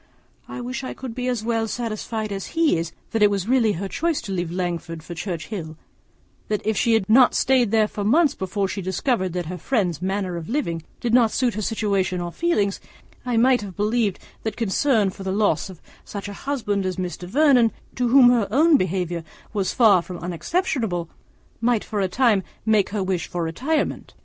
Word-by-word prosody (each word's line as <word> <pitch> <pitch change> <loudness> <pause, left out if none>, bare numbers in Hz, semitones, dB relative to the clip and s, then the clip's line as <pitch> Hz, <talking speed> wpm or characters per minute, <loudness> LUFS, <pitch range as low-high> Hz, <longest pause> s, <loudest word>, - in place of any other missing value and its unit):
I 250 - -6
wish 250 +2 -4
I 255 - -5
could 255 -3 -7
be 250 +1 -3
as 245 -4 -1
well 225 -1 0
satisfied 220 -1 -3
as 195 - -6
he 330 - +4
is, 165 0 -2 0.2
that 225 - -1
it 210 - +7
was 200 -1 -2
really 235 -4 +3
her 195 +3 -4
choice 320 - -1
to 205 - -6
leave 175 -3 -2
Langford 170 -2 -3
for 175 - -7
Churchhill; 170 -1 -5 0.7
and 210 -1 0
if 220 0 +1
she 230 +4 +2
had 190 -4 0
not 245 +3 +6
stayed 255 -4 +3
there 220 0 +3
for 210 - -5
months 290 +8 +4
before 195 +1 -2
she 190 +2 -4
discovered 185 +1 -1
that 180 -1 -2
her 180 +2 -6
friend's 180 - 0
manner 190 -1 -2
of 165 -1 -7
living 195 - -1 0.2
did 235 -1 -2
not 240 -2 +5
suit 245 0 0
her 215 - -3
situation 200 -4 0
or 175 0 -4
feelings, 205 - 0 0.5
I 240 -2 +1
might 250 +1 +4
have 195 -3 -8
believed 210 -1 +1 0.2
that 220 -1 -4
concern 225 -1 +2
for 195 - -12
the 190 0 -2
loss 205 0 +1
of 185 -3 -11 0.2
such 200 0 -6
a 205 - -6
husband 210 -6 -2
as 185 -1 -2
Mr. 180 -1 -5
Vernon, 255 -2 +4 0.2
to 250 0 0
whom 250 0 +7
her 230 -5 +2
own 300 +7 +5
behaviour 175 -3 -2 0.3
was 200 -3 0
far 210 -7 +5
from 180 +1 -8
unexceptionable, 180 - -2 0.5
might 235 -1 +1
for 210 -2 -3
a 190 - +2
time 220 0 +3 0.2
make 215 -3 +3
her 205 -1 -2
wish 185 -3 -1
for 175 -1 -3
retirement. 255 - -2
210 Hz, 200 wpm, -23 LUFS, 185-240 Hz, 0.7 s, it